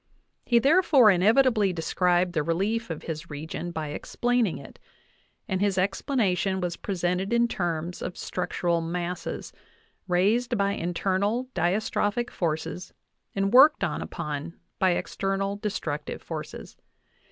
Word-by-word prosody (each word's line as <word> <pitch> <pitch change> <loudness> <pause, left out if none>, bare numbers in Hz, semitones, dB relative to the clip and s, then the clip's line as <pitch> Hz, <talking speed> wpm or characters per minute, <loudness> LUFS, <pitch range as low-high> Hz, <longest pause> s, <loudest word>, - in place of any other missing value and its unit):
He 240 - +4
therefore 280 - +6
inevitably 215 +2 +4
described 175 +1 +1
the 155 - +1
relief 195 +9 -1
of 165 - -5
his 160 0 -6
region 160 +4 -5
by 160 -3 -4
explaining 240 +5 0
it, - - -12 0.7
and 190 -3 -1
his 200 -2 +1
explanation 195 -1 0
was 175 -2 -2
presented 180 +1 -2
in 235 0 +3
terms 175 -4 -3
of 180 - -5
structural 175 -1 -1
masses, 175 +1 -4 0.5
raised 215 +7 +2
by 200 0 +2
internal 200 +7 -1
diastrophic 210 +5 0
forces 170 +1 -3 0.4
and 195 +2 0
worked 285 +4 +7
upon 150 0 -4 0.2
by 185 -2 +4
external 195 +2 -2
destructive 160 -8 -4
forces. - - -7
190 Hz, 120 wpm, -26 LUFS, 175-215 Hz, 0.7 s, worked